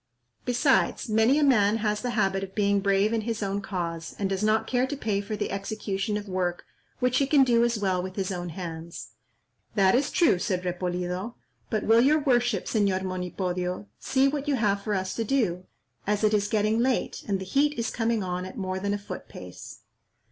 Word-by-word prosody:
Besides, 260 +1 +2
many 225 +6 +4
a 305 - +3
man 220 -6 +4
has 210 -1 -1
the 250 - -2
habit 195 -2 +1
of 195 0 -8
being 200 -1 +2
brave 200 +2 +2
in 225 - +1
his 225 -1 -3
own 200 +1 -1
cause, 170 -4 -4
and 200 - 0
does 190 0 -2
not 215 +1 +2
care 250 +1 +1
to 290 - -4
pay 210 -6 -1
for 210 +1 -4
the - - -3
execution 200 0 -2
of 205 0 -6
work 180 -2 -2 0.3
which 250 0 +2
he 275 - +2
can 280 -1 +5
do 235 -2 +3
as 235 -1 +1
well 190 -3 0
with 185 +1 -6
his 195 -1 -2
own 175 -1 -4
hands." 165 -1 -7 0.7
"That 195 -2 +4
is 265 +3 +2
true," 325 - +3
said 185 0 -1
Repolido; 180 +4 -3 0.3
"but 215 -2 -1
will 225 +1 +5
your 290 +5 +5
worship, 245 -6 +1
Señor 200 -4 +1
Monipodio, 180 0 -3
see 265 +1 +2
what 285 +1 -2
you 290 - +2
have 205 -4 +1
for 205 +1 -1
us 190 0 -2
to 230 - -2
do, 205 -8 0 0.4
as 210 +1 0
it 215 0 +3
is 205 -1 +2
getting 215 +1 +1
late, 255 +1 0
and 195 -2 0
the 190 - -6
heat 285 +8 +1
is 230 -1 -1
coming 225 -2 0
on 180 0 -3
at 185 - -8
more 185 -1 -2
than 200 +1 -1
a - - -2
foot 205 - -8
pace." - - -10
205 Hz, 210 wpm, -27 LUFS, 185-230 Hz, 0.7 s, can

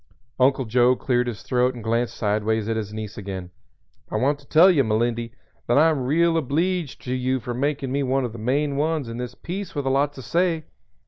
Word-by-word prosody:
Uncle 130 0 +3
Joe 120 +3 +4
cleared 125 -1 0
his 115 -3 -5
throat 125 0 +1
and 120 - -8
glanced 115 +1 0
sideways 110 0 0
at 115 - 0
his 105 -2 -3
niece 110 0 -6
again. 95 -3 -6 0.6
"I - - -5
want 140 +2 +1
to 140 - -20
tell 175 +5 +7
you, 145 -6 +3
Melindy, 115 +1 0 0.4
that 120 - +3
I 160 +2 +6
am 135 -5 -2
real 165 +4 +3
obleeged 165 +2 -1
to 125 - -3
you 130 +1 0
for 120 +1 -5
makin' 135 +1 -1
me 140 +1 0
one 135 0 +1
of 115 - -5
the 115 - -8
main 140 +5 0
ones 155 -2 0
in 115 0 -6
the 125 -1 -4
piece 190 +2 -5
with 145 -2 -2
a 135 - +1
lot 140 +2 +1
to 130 - -10
say. 170 -1 0
130 Hz, 220 wpm, -23 LUFS, 115-145 Hz, 0.6 s, tell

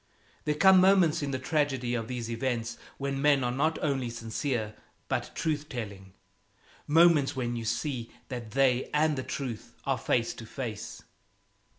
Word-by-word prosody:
There 150 - +1
come 190 +3 +7
moments 185 -5 +4
in 145 - -2
the 135 - -1
tragedy 135 -3 0
of 115 -2 -2
these 120 -2 -4
events 115 -1 -2 0.2
when 135 0 -2
men 140 -2 +4
are 120 - 0
not 155 +5 +1
only 135 -4 0
sincere, 115 0 -3 0.3
but - - -2
truth 155 -2 -1
telling, 100 -7 -6 0.7
moments 155 -3 +5
when 120 -2 -2
you 115 -1 -4
see 120 +1 -2 0.2
that 120 -4 -5
they 130 +1 +2
and 155 0 +3
the 130 - -2
truth 130 -4 -5
are - - 0
face - - +1
to - - -10
face. - - -6
130 Hz, 160 wpm, -29 LUFS, 120-150 Hz, 0.7 s, come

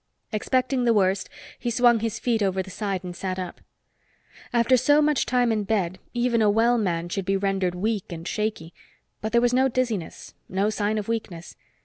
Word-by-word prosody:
Expecting 255 +4 0
the 235 -2 +3
worst, 190 -1 +1 0.3
he 240 - -2
swung 240 0 +4
his 225 -1 -2
feet 230 -3 0
over 190 -1 +1
the 190 - -11
side 195 -2 -3
and 180 -1 -6
sat 185 0 -3
up. 185 -2 -6 0.9
After 240 +1 +4
so 290 +4 +4
much 300 -2 +2
time 245 -2 +2
in 215 -2 0
bed, 190 -4 -1
even 240 -1 +1
a 210 - +4
well 230 +3 +3
man 175 -5 -1
should 195 +3 -3
be 195 +2 +1
rendered 195 -2 0
weak 205 +1 -2
and 165 +1 -6
shaky. 210 -6 -3 0.5
But 220 - -3
there 235 - +4
was 245 0 +2
no 260 +1 +4
dizziness, 235 -9 -3 0.2
no 195 +3 +1
sign 210 0 -1
of 210 - -3
weakness. 195 -7 -4
215 Hz, 195 wpm, -25 LUFS, 190-240 Hz, 0.9 s, swung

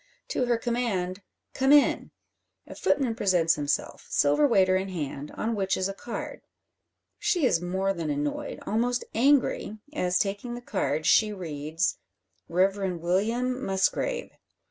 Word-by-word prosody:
To 260 - 0
her 240 -1 +2
command 220 -6 -2 0.3
"Come 265 +1 +2
in!" 290 -1 +4 0.6
a - - -10
footman 260 -5 +1
presents 180 -6 +3
himself, 145 -1 -2
silver 145 - +3
waiter 190 -6 +4
in 190 +1 -1
hand, 150 -4 -5
on 230 +1 -1
which 195 -3 0
is 185 - 0
a 195 - -4
card. 235 +4 -6 0.8
She 410 -7 +1
is 170 -9 +2
more 190 +2 0
than 165 -4 -4
annoyed, 145 0 -2
almost 240 +3 0
angry, 250 -4 +2 0.2
as 180 -10 +1
taking 205 +5 -2
the 240 - -7
card, 155 -9 -2
she 215 +5 +4
reads 160 -2 -2 0.5
"Reverend 185 0 +1
William 230 +9 0
Musgrave." 195 - 0
195 Hz, 140 wpm, -27 LUFS, 175-240 Hz, 0.8 s, in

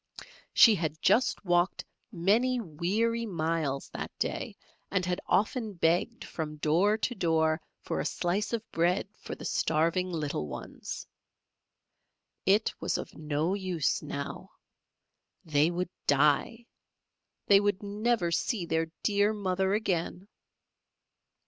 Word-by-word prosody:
She 225 - +8
had 160 -5 -2
just 210 +3 +2
walked 175 0 +1 0.3
many 225 +7 +2
weary 220 +6 -1
miles 160 -6 -1
that - - -5
day, - - -3 0.3
and 185 -2 0
had 180 0 -1
often 215 +1 +1
begged 170 0 +1
from 155 -2 -5
door 170 +8 +2
to 245 - -1
door 160 -5 +1 0.2
for - - -2
a - - -2
slice 185 +4 -1
of 230 -2 -1
bread 175 +4 +1
for - - -7
the - - -9
starving 170 +4 +1
little 150 - -2
ones. 65 - -7 1.4
It 205 +3 +3
was - - -1
of - - -7
no 155 +3 -1
use 185 -6 0
now 140 -1 -6 1.0
they 150 0 +3
would 180 +1 -3 0.2
die! 150 - +3 0.8
They 200 -1 +7
would 205 -1 0
never 205 -2 0
see 185 +2 0
their 160 0 0 0.2
dear 205 0 +3
mother 190 -1 0
again. 185 -2 -2
180 Hz, 125 wpm, -29 LUFS, 160-205 Hz, 1.4 s, She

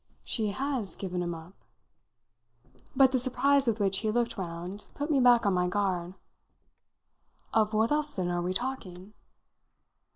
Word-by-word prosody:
"She 220 -3 -1
has 250 - -1
given 180 -2 -4
him 175 -1 -3
up?" 165 +3 -12 1.4
But 265 -1 +6
the 260 - +2
surprise 275 +2 +2
with 225 -1 +1
which 195 -1 +3
he 215 - -1
looked 235 +1 0
round 180 +2 -6
put 290 +2 -3
me 280 - +3
back 245 -2 +5
on 200 - +3
my 180 0 +1
guard. 185 -2 -1 1.4
"Of 215 -1 +3
what 220 +3 +2
else 300 0 +2
then 185 -8 -2
are 175 0 -1
we 180 +1 -2
talking?" 200 -6 -5
210 Hz, 155 wpm, -29 LUFS, 180-255 Hz, 1.4 s, But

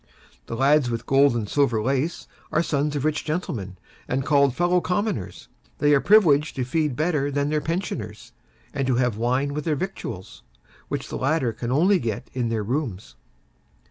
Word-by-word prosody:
The 115 - -4
lads 135 +1 +3
with 115 -1 -3
gold 135 -2 +4
and 110 -3 -2
silver 125 -3 +1
lace 135 +8 -1 0.2
are - - +2
sons 150 -1 -1
of 145 0 -2
rich 155 -1 0
gentlemen 115 - -4 0.3
and 130 +1 -1
called 140 -4 +3
Fellow 175 +1 +2
Commoners; 185 - -2 0.3
they 145 0 +3
are 140 - +4
privileged 165 -8 +4
to 130 - -1
feed 150 +1 0
better 150 -2 0
than 145 0 -1
the 155 -1 +1
pensioners, 125 - -4 0.4
and 135 -2 -1
to 130 - +2
have 125 -3 +1
wine 130 +5 0
with 150 +1 -3
their 155 -2 +1
victuals, 145 - -6 0.5
which - - -4
the - - -4
latter 135 -3 +1
can 120 +2 -4
only 180 +8 +4
get 115 -4 -4
in 125 -3 -1
their 110 -2 -1
rooms. 105 - -3
140 Hz, 175 wpm, -24 LUFS, 120-155 Hz, 0.5 s, gold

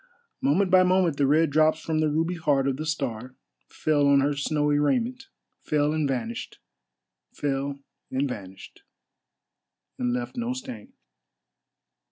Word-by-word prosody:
Moment 200 -9 +2
by 185 0 +7
moment 180 -4 +2
the 140 - +2
red 155 +2 +3
drops 155 +1 +3
from 160 0 -2
the 155 -1 +2
ruby 165 +4 0
heart 145 -5 +1
of 135 -1 -1
the 155 +1 -4
star 130 -5 -3 0.3
fell 145 -2 +1
on 140 0 +5
her 145 +1 +1
snowy 145 +1 +1
raiment, 245 - 0 0.3
fell 150 0 +1
and 155 -2 0
vanished,—fell 135 +3 -6 0.3
and 135 +2 0
vanished,—and 105 +3 -10
left 120 0 -3
no 240 +1 -2
stain. 125 - -8
145 Hz, 130 wpm, -26 LUFS, 135-160 Hz, 0.3 s, by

